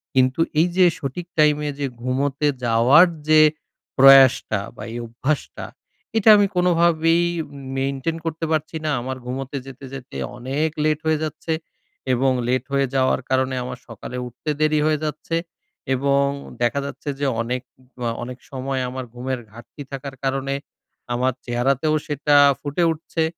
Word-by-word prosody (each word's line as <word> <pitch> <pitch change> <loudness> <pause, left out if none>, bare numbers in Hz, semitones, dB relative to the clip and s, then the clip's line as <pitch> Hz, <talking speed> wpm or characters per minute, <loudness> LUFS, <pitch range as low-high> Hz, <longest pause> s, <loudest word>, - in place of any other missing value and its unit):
কিন্তু 130 +3 +3 0.2
এই 170 - +5
যে 185 - +7
সঠিক 160 +6 -5
টাইমে 150 0 +3
যে 140 - 0 0.2
ঘুমোতে 135 +3 0 0.2
যাওয়ার 120 +9 +6 0.2
যে 155 0 +7 0.6
প্রয়াসটা 135 -5 +7 0.2
বা - - -8
এই - - -4
অভ্যাসটা, 135 +6 -3 0.5
এটা 220 0 +5
আমি 205 - +4
কোনোভাবেই 170 -1 +3 0.5
মেইনটেইন 135 +4 -2
করতে 165 0 -2
পারছি 155 +1 -1
না। 150 - +1
আমার 130 +1 -4
ঘুমোতে 135 +2 -4
যেতে, 135 0 -10
যেতে 125 - -8 0.2
অনেক 140 +6 -1 0.2
লেট 155 -1 +2
হয়ে 155 -1 +2
যাচ্ছে 160 +1 -3 0.6
এবং 130 +2 +2 0.2
লেট 125 0 +1
হয়ে 140 -1 +2
যাওয়ার 130 0 +2
কারণে 130 0 +1
আমার 125 0 -6
সকালে 115 +2 -8
উঠতে 135 +6 -7
দেরি 155 0 +3
হয়ে 155 -1 +2
যাচ্ছে। 155 +2 -3 0.6
এবং 140 +1 +2 0.4
দেখা 120 +4 +1
যাচ্ছে 140 +1 -6
যে 145 - 0 0.2
অনেক 125 +2 -2 0.4
অ - - +1 0.2
অনেক 125 +1 -7
সময় 135 0 -3
আমার 130 0 -5
ঘুমের 130 +1 -3
ঘাটতি 120 +5 -12
থাকার 135 0 -6
কারণে 135 0 -1 0.6
আমার 125 +1 +1
চেহারাতেও 135 +5 +1
সেটা 145 0 +1 0.3
ফুটে 145 +4 -1
উঠছে 160 +1 -3
135 Hz, 145 wpm, -22 LUFS, 130-155 Hz, 0.6 s, যে